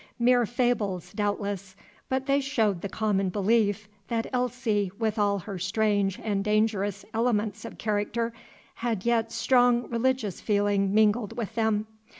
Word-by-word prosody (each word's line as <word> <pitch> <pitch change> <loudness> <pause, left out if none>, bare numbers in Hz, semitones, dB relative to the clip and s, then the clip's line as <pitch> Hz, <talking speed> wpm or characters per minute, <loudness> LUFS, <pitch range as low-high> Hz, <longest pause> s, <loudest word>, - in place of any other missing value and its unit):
Mere 245 -1 +4
fables, 225 -7 -1
doubtless; 200 -2 -2 0.3
but 265 0 -1
they 280 +1 +2
showed 220 -9 0
the 200 - -4
common 195 -2 0
belief, 210 +1 +1 0.2
that 230 -1 -1
Elsie, 245 -6 0
with 220 -1 -1
all 200 -1 +2
her 195 0 -6
strange 200 +1 +1
and 200 -3 0
dangerous 210 -2 0
elements 220 -2 0
of - - -8
character, 220 +2 -1 0.4
had 230 -4 -3
yet 230 -1 +1
strong 245 -2 +3
religious 235 -4 0
feeling 205 -2 +1
mingled 215 +1 +2
with 225 -2 -3
them. 220 -1 +1
215 Hz, 140 wpm, -27 LUFS, 205-235 Hz, 0.4 s, Mere